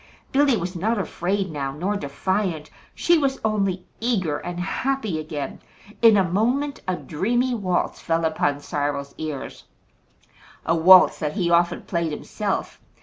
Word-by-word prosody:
Billy 275 -3 +3
was 180 0 -4
not 220 +7 0
afraid 190 -1 -2
now, 140 -3 -3
nor 180 +9 -2
defiant. 180 +1 -2 0.2
She 345 -1 +3
was 275 -2 0
only 195 -4 0
eager 190 -11 0
and 175 0 -6
happy 215 -1 -1
again. 155 -2 -5 0.4
In 225 -2 +7
a 195 - +4
moment 245 +11 0
a 185 - +1
dreamy 240 +11 -1
waltz 185 -6 -1
fell 165 0 0
upon 145 -2 0
Cyril's 145 -1 -3
ears 155 -4 -6 1.0
a 165 - +2
waltz 180 +3 +7
that 150 -1 -2
he 175 -4 0
often 170 0 +2
played 170 -3 -2
himself. 150 - -4
180 Hz, 145 wpm, -23 LUFS, 160-215 Hz, 1.0 s, In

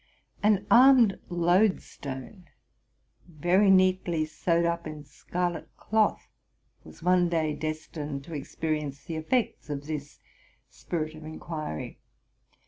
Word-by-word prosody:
An 205 -1 +3
armed 245 -5 +7
loadstone, 175 - 0 0.8
very 175 +5 +2
neatly 185 -4 +3
sewed 170 +2 0
up 170 -1 -1
in 155 -1 -8
scarlet 175 +4 -4
cloth. 220 0 +1 0.6
was - - -14
one 180 -1 +3
day 160 -3 0
destined 150 -2 -5
to 165 - -10
experience 150 -1 -3
the 160 +1 -5
effects 215 +3 -1
of 145 -1 -4
this 150 -2 -6 0.5
spirit 155 -2 -4
of 155 0 -11
inquiry. 155 - -6
165 Hz, 110 wpm, -28 LUFS, 155-185 Hz, 0.8 s, armed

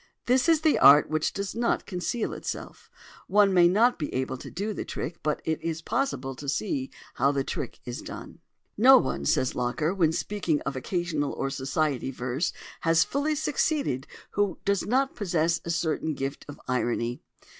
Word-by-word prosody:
This 255 +5 +3
is 320 -2 +4
the 315 -1 +3
art 145 +2 +7
which 155 0 +1
does 200 0 -4
not 235 +2 0
conceal 185 +5 -2
itself. - - -7 0.4
One 200 -1 +4
may 175 -1 +6
not 225 +7 +3
be 150 - -3
able 130 0 -1
to - - -9
do 205 +4 -3
the - - -4
trick; 170 - -5
but 150 -1 -1
it 160 -1 -1
is 165 0 -3
possible 135 - -1
to 140 0 -5
see 140 -4 -1 0.2
how 135 +3 +2
the 140 -1 0
trick - - -5
is 120 0 -5
done. - - -9 0.4
"No 260 +5 +8
one," 70 - -1
says 130 - +2
Locker, 125 +7 -1
when 170 -5 +2
speaking 170 -3 -1
of 135 0 -4
occasional 155 +1 -2
or 135 - -2
society 135 0 -1
verse, 130 +4 -2 0.3
"has 165 0 +4
fully 295 +2 -1
succeeded 285 - 0 0.2
who 205 -3 0
did 200 -2 +1
not 265 +4 +1
possess 170 -5 0
a - - -5
certain 160 -2 -1
gift 135 +1 -4
of 145 - -9
irony." 120 -1 -1
165 Hz, 175 wpm, -27 LUFS, 135-205 Hz, 0.4 s, No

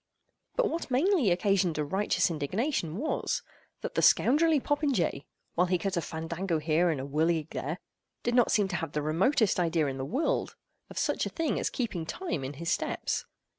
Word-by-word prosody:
But - - +3
what 335 -5 -3
mainly 285 - +3
occasioned 180 -2 +2
a 150 - 0
righteous 190 +3 +1
indignation 170 - -1
was, 310 +7 -1 0.4
that - - -4
the - - +1
scoundrelly 310 +3 +5
popinjay, 270 - 0 0.3
while 180 +2 +2
he 180 0 +2
cut 195 +3 -2
a 170 - +1
fandango 165 +2 -2
here, 160 +3 +2
and 155 -4 0
a - - -3
whirligig 155 +2 0
there, 150 +6 -3 0.5
did 240 - 0
not 245 -1 +4
seem 205 -2 +3
to 175 - -1
have 160 -2 -4
the 150 - -1
remotest 190 - +2
idea 165 -2 +2
in 135 -1 -3
the - - -2
world 290 - -1 0.3
of - - -11
such - - 0
a - - -4
thing 325 -3 -1
as - - 0
keeping 185 -10 -3
time 260 - -3
in 135 +2 -4
his 170 +5 -3
steps. - - -1
180 Hz, 190 wpm, -29 LUFS, 160-250 Hz, 0.5 s, scoundrelly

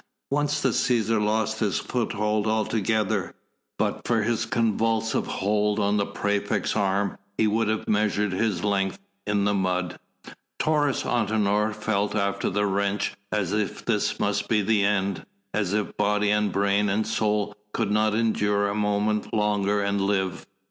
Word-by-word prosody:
Once 145 +1 +1
the 135 - +2
Cæsar 115 -2 +1
lost 110 +1 0
his 105 -4 +1
foothold 105 -3 -1
altogether; 110 -1 0 0.4
but - - -2
for 115 -3 +2
his 115 +1 0
convulsive 115 0 0
hold 105 +1 0
on 100 +1 +2
the 100 - 0
praefect's 105 0 -1
arm 100 -1 0 0.2
he 110 - +3
would 110 +1 +1
have 110 0 -1
measured 105 -1 +1
his 100 +1 -1
length 100 -2 0 0.3
in 100 -1 +1
the 105 - +2
mud. 90 -2 -1 0.6
Taurus 145 -4 +1
Antinor 105 -2 +1
felt 105 -1 -1
after 100 -1 0
the 105 0 0
wrench 100 0 0 0.2
as 100 -3 0
if 105 -1 -2
this - - 0
must - - 0
be 105 -2 +2
the 105 0 +2
end, 100 -2 0 0.3
as 100 -4 0
if 105 0 -1
body 105 0 +2
and 105 0 +2
brain 100 +1 +2
and 105 +2 +1
soul 105 -1 0 0.2
could 110 -2 -1
not 105 0 +2
endure 105 -2 +1
a - - -2
moment 105 0 0
longer 105 -1 +1
and 100 0 0
live. 95 -2 -1
105 Hz, 155 wpm, -25 LUFS, 100-110 Hz, 0.6 s, he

